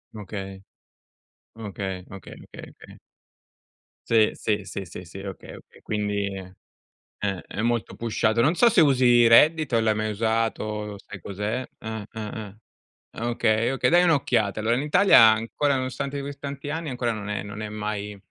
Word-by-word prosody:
Okay. 95 -2 -7 0.9
Okay, 100 -4 -5
okay, 95 -1 -10
okay, - - -11 0.2
okay. - - -13 1.1
Sì, 110 -2 +4
sì, 105 -2 -2
sì, 100 - -5
sì, 90 0 -10
sì, 85 +3 -10
okay, 95 -1 -8
okay, - - -17
quindi, 105 -2 -2
ehm 95 -1 -9 0.7
eh, 100 -3 -2
è 105 - -5
molto 120 -1 -1
pushato. 115 0 0
Non 145 +7 +3
so 235 +6 +5
se 205 - +3
usi 125 -5 +5
Reddit, 150 +4 +5
o 115 - +4
l'hai 110 -1 +2
mai 110 0 -1
usato, 105 -1 -2
sai 100 - -11
cos'è? 105 +7 -4
Eh, 110 0 -5
eh, 110 - -6 0.2
eh. 105 -2 -8 0.6
Ah 115 - -4
okay, 115 -1 +1
okay, 135 0 +1
dai 175 +1 +6
un'occhiata, 125 - +1
allora 115 +2 +2
in 130 - -1
Italia 180 +4 +5
ancora 115 +6 +1
nonostante 135 +2 -3
così 140 0 -7
tanti 140 0 -6
anni 160 +1 -3
ancora 120 -2 -1
non 105 -2 -6
è 105 0 -3
non 100 +1 -8
è 110 - -4
mai 105 -1 -4
110 Hz, 165 wpm, -25 LUFS, 105-130 Hz, 1.1 s, dai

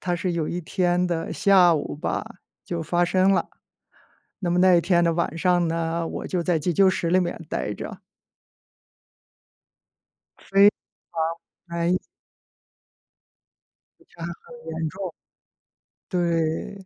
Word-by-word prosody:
它 175 -1 -1
是 180 0 -2
有 165 -2 -1
一 175 - -3
天 180 +1 +1
的 170 -2 -2
下 185 -4 +5
午 150 - -3
吧， 150 - -2 0.4
就 170 -2 -3
发 175 +2 +1
生 185 +2 +3
了。 180 -3 +1 0.9
那 180 - -2
么 175 +1 +2
那 185 0 +6
一 170 - +4
天 175 -1 +3
的 170 -1 +2
晚 165 -1 -1
上 175 0 +2
呢， 165 0 -1
我 - - -5
就 180 -2 -1
在 170 -2 +1
急 170 +4 -1
救 195 +2 +5
室 170 -2 -1
里 185 +2 +4
面 175 -1 -2
呆 65 - -2
着。 - - -8 2.5
非 200 +1 +7 1.0
常， 170 - -5
哎。 175 +2 +2 2.0
一 345 - -25
查 170 - -12
很 170 +8 -9 0.2
严 160 0 -2
重， 185 0 -6 0.9
对。 170 +2 -1
175 Hz, 145 characters per minute, -24 LUFS, 165-185 Hz, 2.5 s, 非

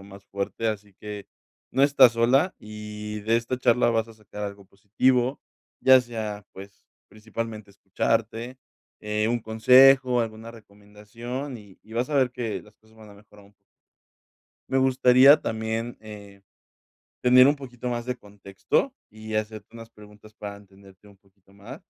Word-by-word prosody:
o - - -14
más 100 0 -14
fuerte, 100 +3 -3
así 105 -1 -5
que 105 -1 -8 0.4
no 135 - +1
estás 140 -3 +6
sola 130 +10 +2
y 105 0 -8
de 110 +3 +1
esta 115 +2 -2
charla 125 -1 +3
vas 115 0 -1
a 115 - -14
sacar 105 -1 -10
algo 100 -1 -8
positivo, 120 +7 0 0.4
ya 130 0 +7
sea, 110 -4 -6
pues, 100 +1 -13 0.2
principalmente 110 0 -7
escucharte, 115 +5 -3 0.4
eh, 105 +1 -1
un 120 0 -1
consejo, 125 +3 +5
alguna 110 0 -5
recomendación, 115 +5 -9
y 100 -3 -17
y 110 - -17
vas 120 +5 -2
a - - -2
ver 130 -2 +3
que 120 -3 -4
las 105 0 -21
cosas 110 0 -26
van 110 -1 -15
a - - -15
mejorar 105 0 -19
un 100 - -24
poco. - - -40 1.2
Me 135 - +1
gustaría 130 +1 +6
también, 110 +2 -4
eh, 100 -2 -12 0.8
tener 125 +1 +7
un 145 - +2
poquito 125 -3 -8
más 120 -1 -3
de 125 0 -3
contexto 100 -3 -3 0.2
y 110 0 -9
hacerte 110 -1 -4
unas 115 -1 -11
preguntas 105 0 -17
para 105 -2 -8
entenderte 100 0 -19
un 100 - -19
poquito 95 0 -29
más. 105 +9 -12
110 Hz, 160 wpm, -25 LUFS, 105-125 Hz, 1.2 s, ya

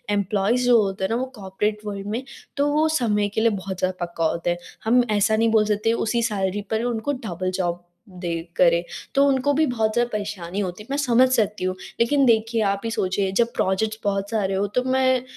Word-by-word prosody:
Employees 205 +5 +1
जो 240 -3 +6
होते 195 -1 -2
हैं 190 - 0
ना - - +1
वो - - -1
कॉर्पोरेट 210 +2 -2
वर्ल्ड 200 -1 -5
में 255 - -3 0.3
तो 285 +1 +2
वो 310 +1 +3
समय 210 -3 +1
के 220 - 0
लिए 230 - +4
बहुत 190 -2 -5
ज़्यादा 185 -1 -1
पक्का 170 -1 -3
होता 170 +2 0
है। 175 - 0 0.3
हम 245 +3 +4
ऐसा 210 +1 +3
नहीं 225 +1 +2
बोल 215 -1 +4
सकते 215 +2 +1
उसी 235 0 +1
सैलरी 205 -3 -1
पर 220 +1 0
उनको 240 +3 -1 0.2
डबल 185 +1 -3
जॉब 175 -2 +1 0.4
दे 180 -1 -6 0.3
करें 170 -1 +4 0.3
तो 275 - +5
उनको 275 +1 +2
भी 310 +2 +3
बहुत 220 -4 0
ज़्यादा 240 0 +1
परेशानी 200 -3 -4
होती 185 +1 -4
है - - -20
मैं 280 - 0
समझ 255 -2 +4
सकती 210 -5 +1
हूँ। 185 0 -1 0.2
लेकिन 275 +4 +3
देखिए 225 -1 +2
आप 200 0 -1
ही - - -1
सोचिए 190 -2 0
जब 235 0 +3
प्रोजेक्ट्स 215 +3 0
बहुत 200 0 -1
सारे 205 -4 0
हो 200 +1 +1
तो 250 - +2
मैं 260 -1 +2
210 Hz, 220 wpm, -23 LUFS, 190-235 Hz, 0.4 s, जो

